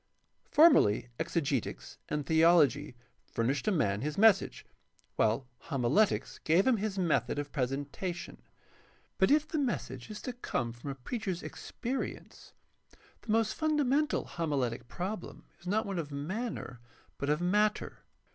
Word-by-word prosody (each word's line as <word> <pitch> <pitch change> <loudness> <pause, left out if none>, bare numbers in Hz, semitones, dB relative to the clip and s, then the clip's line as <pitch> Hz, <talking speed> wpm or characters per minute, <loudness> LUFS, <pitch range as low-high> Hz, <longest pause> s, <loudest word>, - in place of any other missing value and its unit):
— - - -47
Formerly 125 - +6
exegetics 140 -7 -2
and 150 -1 -2
theology 160 -3 +4 0.3
furnished 130 - -1
a - - +4
man 105 - +1
his 150 +2 -3
message, 210 -2 +4 0.5
while 115 +4 +1 0.2
homiletics 140 - +1
gave 170 +5 +3
him 255 -3 +4
his 205 -1 -3
method 175 -5 +1
of 145 -1 -3
presentation. 145 +7 -3 0.8
But 190 - +5
if 300 +1 +4
the 315 0 -2
message 130 - -3
is 215 - -6
to 250 - -4
come 120 - -3
from 120 +4 -8
a 135 - -4
preacher's 185 - -4
experience, 260 +3 -6 0.7
the 225 - -5
most 225 -1 +2
fundamental 300 -1 +1
homiletic 135 -8 -2
problem 185 - -5
is 175 - -13
not 215 +4 +1
one 195 -3 -3
of 150 -3 -5
manner 155 - -4 0.4
but 140 - -2
of 150 +1 +2
matter. 210 +4 +1
170 Hz, 135 wpm, -31 LUFS, 140-215 Hz, 0.8 s, Formerly